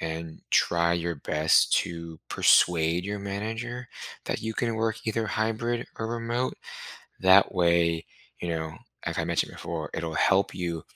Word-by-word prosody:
and 80 0 -5
try 85 0 +3
your 85 0 -1
best 75 +2 +2
to 85 -1 -7
persuade 85 0 +4
your 100 +1 -3
manager 115 +5 -4 0.4
that - - -2
you 110 - -2
can 115 0 -1
work 110 0 0
either 110 0 0
hybrid 115 +2 -1
or 110 - -2
remote. 120 +2 -2 0.7
That 95 +1 +6
way, 85 -2 +3 0.4
you 90 - -4
know, 80 -1 -3 0.3
like - - -2
I - - +1
mentioned - - 0
before, - - -5
it'll 80 -1 -3
help 95 +5 +3
you, 85 -3 -3
95 Hz, 150 wpm, -27 LUFS, 85-110 Hz, 0.7 s, That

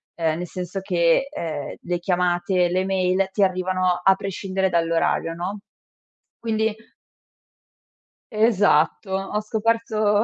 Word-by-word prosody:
ehm, 160 -2 0
nel 180 +1 -4
senso 180 +2 -5
che, 175 +4 +2
ehm, 155 - -5
le 175 0 -2
chiamate, 175 0 +1
le 185 +2 0
mail 190 0 +1
ti 205 - +2
arrivano 185 -1 +1
a 190 +1 +5
prescindere 190 0 -2
dall'orario, 165 -1 +1
no? 180 +5 -4 0.8
Quindi 220 -1 0 1.6
Esatto, 205 -5 +2
ho 195 +2 -1
scoperto 215 -1 +1
185 Hz, 110 wpm, -23 LUFS, 175-205 Hz, 1.6 s, a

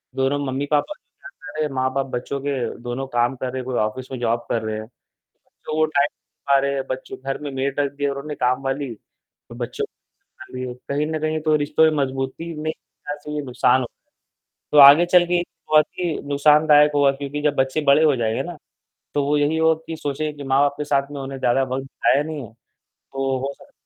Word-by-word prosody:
दोनों 135 +2 +1
मम्मी-पापा। 145 - 0 0.6
अरे! 155 -1 +1
माँ-बाप 130 +1 0
बच्चों 130 +3 -3
के 140 0 -1 0.3
दोनों 120 +2 -4
काम 120 0 +1
कर 130 - -5
रहे - - -3
हैं, 130 - -6
कोई 130 -1 -3
ऑफ़िस 110 +4 -2
में 130 - -5
जॉब 120 0 0
कर 115 - 0
रहे 110 0 -3
हैं। 110 - -8 0.8
तो - - -3
वो 155 - +4
टाइम 145 -2 +2 0.4
पा 140 0 +5
रहें, 140 0 -1
बच्चों 130 0 -5
के - - -26
घर 135 - -1
में 145 -1 -5
मेड 135 +1 -2 0.2
दिया 145 0 0
और 140 - -5
उन्हें 150 0 -6
काम 125 +1 +1
वाली। 135 +1 -2 0.6
बच्चों - - -4 0.4
सँभालिए, 125 -1 -8 0.2
कहीं 145 +2 0
न 155 0 -2
कहीं 155 0 -1
तो 155 0 +2
रिश्तों 150 +1 +2
में 150 -2 +1
मजबूती 135 +5 -4
में 155 0 -1
ऐसा 145 -1 -9
ये 150 - -1
नुकसान 125 0 +2
होता 120 - -6 0.6
है। - - -60
तो 150 - +3
आगे 150 +5 +8
चल 175 0 +5
के 175 +1 0
ये 175 - 0 0.3
बहुत 155 0 +6
ही 175 -3 0 0.2
नुकसानदायक 150 +1 +5
होगा, 140 -1 +5
क्योंकि 140 +1 -5
जब 145 -1 +1
बच्चे 135 +3 +1
बड़े 155 +3 +5
हो 150 -3 +4
जाएँगे 115 -2 -1
ना? 175 -2 -7 0.6
तो 145 - +1
वो 145 +1 +1
यही 145 +2 +1
होती 160 0 +1
सोचे 150 +1 -3
कि 145 -1 -10
माँ-बाप 140 +1 +2
ने - - 0
साथ 140 -1 0
में 140 - -5
उन्हें 135 0 -6
ज़्यादा 130 +1 +2
वक़्त 130 0 -3
बिताया 135 +1 +1
नहीं। 150 -5 -6 0.6
तो 135 -1 -1
वो 135 +2 -3
स - - -19
140 Hz, 205 wpm, -22 LUFS, 130-150 Hz, 0.8 s, आगे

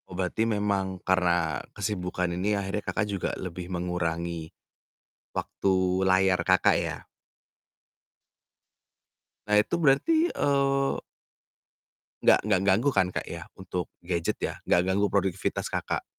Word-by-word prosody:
Oh 90 - -8
berarti 95 +5 0
memang 100 -3 0
karena 85 -6 +2 0.2
kesibukan 90 -3 -2
ini, 100 +4 0
akhirnya 100 +1 -2
Kakak 110 - 0
juga 100 -2 -2
lebih 90 -1 -6
mengurangi, 85 -2 -2 0.8
waktu 95 -1 0
layar 95 -1 +3
Kakak, 95 +1 +4
ya? - - -3 2.4
Nah, 105 - +3
itu 110 - -2
berarti, 315 - +3
eee 140 - +1 1.2
nggak - - +6
nggak 100 -3 +2
ganggu, 110 +9 +3
kan, 95 -3 +3
Kak, - - -4
ya, - - -8
untuk 90 -1 -4 0.2
gadget, 85 -2 -1
ya, - - -2 0.2
nggak 90 - +5
ganggu 100 +1 +2
produktivitas 95 -1 -1
Kakak? - - -2
95 Hz, 120 wpm, -27 LUFS, 90-105 Hz, 2.4 s, nggak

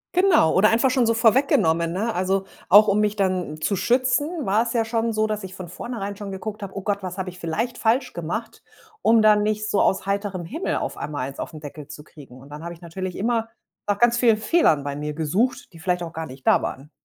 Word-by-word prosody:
Genau. 360 - +4
Oder 210 +3 +5
einfach 235 +3 +3
schon 250 -2 +2
so 230 - +2
vorweggenommen, 220 - +3
ne? 215 +6 -1
Also, 190 +1 0 0.2
auch 210 +3 +8
um 200 - +2
mich 210 0 +1
dann 185 -6 -1
zu 200 - 0
schützen, 260 - +1
war 205 +3 +2
es 230 0 -2
ja 230 -1 +1
schon 230 0 -1
so, 215 0 +1
dass 215 -1 -3
ich 190 -1 -8
von 185 -2 -8
vornherein 205 +1 -5
schon 200 -1 -7
geguckt 210 +2 -6
habe: 195 -2 -7
„Oh 195 - -5
Gott, 200 0 -1
was 185 0 -6
habe 190 -1 -3
ich 180 - -15
vielleicht 225 +9 -3
falsch 250 +3 +1
gemacht“, 180 +8 -5 0.4
um 225 -1 +4
da 215 -1 +7
nicht 215 +1 -1
so 200 - +2
aus 190 0 +1
heiterem 200 -3 -2
Himmel 315 - -3
auf - - -4
einmal 145 -3 -4
eins 140 - -12
auf - - -5
'n 155 - -8
Deckel 150 -1 -9
zu 150 0 -10
kriegen. 140 -5 -15
Und 140 +2 -15
dann 150 +2 -9
habe 170 0 -6
ich 170 - -21
natürlich 180 +2 -6
immer 225 +1 0 0.4
nach 205 - +1
ganz 240 +2 +4
vielen 230 -3 +4
Fehlern 215 - +2
bei 145 0 -4
mir 150 +1 -4
gesucht, 210 - -1
die 165 - -13
vielleicht 180 +1 -1
auch 165 -1 -7
gar 160 0 -5
nicht 130 +1 -13
da - - +4
waren. 135 +3 -6
200 Hz, 245 wpm, -23 LUFS, 170-230 Hz, 0.4 s, auch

